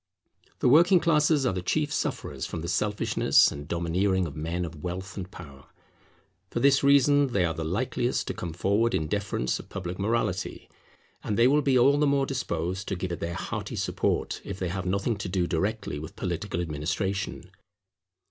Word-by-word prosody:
The - - +3
working 170 +7 +6
classes 150 -3 +3
are 125 - +1
the 90 - -3
chief 150 - 0
sufferers - - -3
from 80 - -5
the 85 - -5
selfishness 105 +4 +3
and 70 0 -7
domineering 90 +3 0
of 75 -4 -7
men 85 +3 -2
of 80 -2 -9
wealth 95 +4 -5
and 95 -2 -6
power. 70 -9 -12 0.8
For - - -2
this 140 0 +4
reason 140 0 +5
they 90 -3 +3
are 80 - -1
the 80 +1 -4
likeliest 120 +8 -1
to - - -3
come 85 - -5
forward 100 +7 +1
in 80 - -1
defence 95 -9 -1
of - - -11
public 90 -1 -5
morality. 115 +4 -1 0.6
And 105 - -2
they 115 +1 +6
will 145 +3 +4
be 135 -2 +3
all 140 +4 +5
the 150 - +3
more 140 -1 +2
disposed 95 -8 -3
to 95 - -1
give 90 0 -4
it 85 - -4
their 85 +1 -3
hearty - - -4
support - - -1
if - - -6
they 90 -2 -2
have 95 +1 -3
nothing 100 +4 0
to 100 -1 -5
do 90 -1 +1
directly 95 -2 -2
with 80 - -9
political 85 - -3
administration. 85 +4 -3
95 Hz, 185 wpm, -27 LUFS, 85-125 Hz, 0.8 s, working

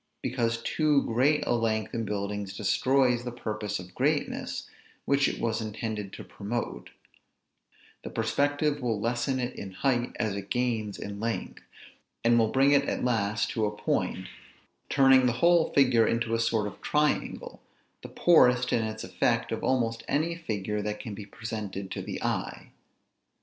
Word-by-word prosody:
Because 115 -2 -1
too 150 -3 +2
great 135 +6 +2
a - - +1
length 110 -2 0
in 115 -1 -2
buildings 100 -1 -3
destroys 125 +4 +2
the 120 - -4
purpose 105 -3 -4
of 90 0 -10
greatness, - - -1 0.4
which 140 0 +3
it - - -3
was 115 -1 -1
intended 110 -2 -4
to - - -8
promote; 105 - -5 1.1
the - - -5
perspective 145 +1 0
will 115 -4 -1
lessen 120 +4 -1
it 125 0 -3
in 100 - -6
height 120 +3 0
as 110 -4 -1
it 100 0 -6
gains 115 -4 -1
in 100 0 -6
length; 115 +1 -3 0.6
and 120 0 +5
will 110 - +4
bring 135 +3 +4
it 140 -1 +3
at - - -2
last 105 -4 0
to 110 -2 0
a 105 0 -6
point; 95 - -1 0.6
turning 135 -1 +5
the 120 - +2
whole 170 +3 +4
figure 125 -5 +4
into 115 0 0
a 115 - +1
sort 115 -2 +1
of 105 - -7
triangle, 150 0 -1 0.4
the - - -9
poorest 125 -7 +4
in 115 - +3
its 110 0 -4
effect 115 +6 0
of 115 - -3
almost 115 -3 +1
any 160 +4 +1
figure 105 - -3
that 105 0 -3
can 110 -5 -6
be 100 0 -8
presented 105 -4 -6
to - - -4
the - - -5
eye. - - -3
115 Hz, 165 wpm, -28 LUFS, 105-130 Hz, 1.1 s, and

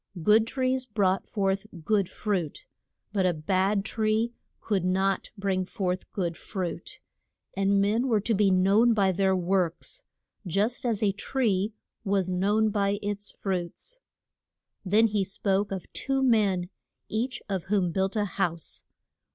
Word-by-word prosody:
Good 220 +3 +5
trees 255 0 0
brought 195 -4 +1
forth 195 0 -1 0.2
good 205 -4 +2
fruit; 185 -8 -3 0.5
but 190 -3 +2
a 175 - +1
bad 195 +5 +1
tree 220 +2 0 0.3
could 200 -5 -1
not 190 +2 +1
bring 195 -2 0
forth 185 -1 -3
good 175 -4 -2
fruit. 185 -1 -5 0.6
And 195 0 +2
men 215 +6 +2
were 225 -4 +3
to 225 +3 0
be 205 -1 +3
known 200 +5 +4
by 195 -3 +3
their 190 +1 +2
works, 185 - -1 0.4
just 210 +8 0
as 220 -2 0
a 200 - +4
tree 210 -1 0 0.3
was 195 -3 0
known 205 +4 +2
by 200 0 +1
its 205 0 -3
fruits. 190 - -4 0.8
Then 210 +4 +4
he 210 -2 +1
spoke 195 +1 -1
of 190 -3 -4
two 270 0 0
men, 200 -7 +2 0.4
each 240 +4 -2
of 190 -4 -2
whom 190 -3 +1
built 190 +4 0
a 210 -1 +1
house. 170 -4 -3
200 Hz, 145 wpm, -27 LUFS, 185-215 Hz, 0.8 s, Good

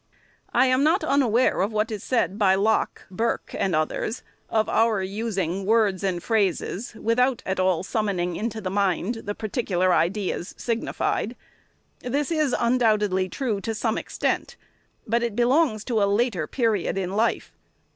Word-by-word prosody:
I 245 +2 +4
am 255 +1 +3
not 330 +6 +3
unaware 255 -6 +2
of 200 +3 0
what 215 +1 0
is 210 -1 -5
said 210 -5 0
by 190 -2 +4
Locke, 215 +3 0
Burke, 225 +5 -2
and 190 -4 0
others, 155 +9 -2 0.3
of 220 -1 +1
our 225 -3 +2
using 195 -3 -2
words 205 -2 +2
and 180 -3 -1
phrases, 215 0 -1
without 245 +3 +1
at 190 0 -2
all 185 -2 +2
summoning 190 -5 -1
into 220 +2 -3
the 185 -2 -3
mind 200 +3 0
the 205 +1 -3
particular 195 -5 0
ideas 180 +1 -1
signi 230 -1 -3
fied. - - -1 0.6
This 280 +5 -2
is 305 -5 +1
undoubtedly 215 -6 +2
true, 225 -6 -2
to 225 +1 -3
some 220 0 0
extent, - - -2 0.5
but 235 +2 +1
it 235 -3 -2
belongs 245 -2 +2
to 230 -4 0
a 200 - +3
later 205 -7 0
period 225 -7 0
in 185 -1 -2
life. 220 +4 0
215 Hz, 155 wpm, -24 LUFS, 190-235 Hz, 0.6 s, I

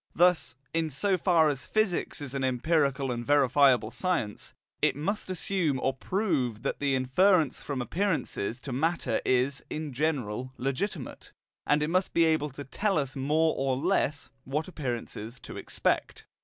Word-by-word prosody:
Thus, 175 -6 +3 0.2
in 165 -1 0
so 190 +7 +1
far 170 -3 +4
as 140 -3 -1
physics 215 -8 0
is 140 -2 -6
an 135 -1 -2
empirical 135 0 +1
and 120 -1 -3
verifiable 135 -4 +4
science, 170 - -2 0.3
it - - +3
must 190 +8 -2
assume 180 -6 0
or 135 - 0
prove 135 - -1
that - - -2
the 140 -2 +1
inference 155 +4 +3
from 135 -4 -3
appearances 165 - -1
to 135 - -6
matter 145 -3 0
is, 130 +2 +1
in 155 -2 -4
general, 130 -4 -2
legitimate, 135 +11 -4 0.4
and 150 0 +3
it 155 - -1
must 185 +1 +1
be 170 - +5
able 155 -2 +2
to 140 +1 -8
tell 195 +7 0
us, 140 -2 -1
more 155 +4 +2
or 135 -1 0
less, 155 -2 0
what 150 +4 -2
appearances 125 - -5
to - - -9
expect. - - -1
145 Hz, 155 wpm, -28 LUFS, 130-165 Hz, 0.4 s, be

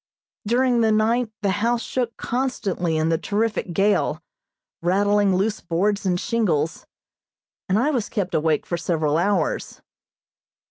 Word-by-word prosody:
During 245 +1 +2
the 220 -1 +3
night 225 +2 +2
the 200 - +2
house 235 +1 +1
shook 240 -3 -3
constantly 200 -10 -1
in 155 +1 +1
the 165 -1 +1
terrific 210 -3 -1
gale, 200 +4 +1 0.6
rattling 200 +2 +2
loose 205 +3 0
boards 200 +4 0
and 180 -1 +1
shingles, 165 -10 -1 0.8
and 190 - +3
I 270 +7 +2
was 245 -7 -1
kept 195 -4 -2
awake 155 -1 +1
for 175 - -2
several 160 -3 0
hours. 185 -3 -1
205 Hz, 135 wpm, -23 LUFS, 175-230 Hz, 0.8 s, the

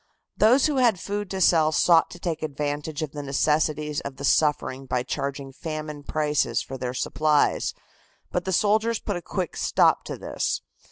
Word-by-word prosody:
Those 245 +6 +5
who 300 -3 +1
had 235 -7 +3
food 205 +2 -4
to 190 - -3
sell 160 -3 +4
sought 165 +1 +4
to - - -10
take 170 -2 -3
advantage 150 +1 -3
of 150 - -4
the 150 - -6
necessities 150 +1 0
of 140 -1 -7
the 140 +1 -5
suffering 135 -3 +1
by 125 -1 0
charging 140 +1 -4
famine 155 -1 -6
prices 150 -5 0
for 135 - -6
their 125 -1 -4
supplies, 150 +2 +1 0.6
but 180 - -1
the 190 - -3
soldiers 215 +4 +2
put 205 - -4
a 175 - -4
quick 180 -1 -4
stop - - +3
to - - -5
this. - - -2
155 Hz, 175 wpm, -25 LUFS, 145-180 Hz, 0.6 s, Those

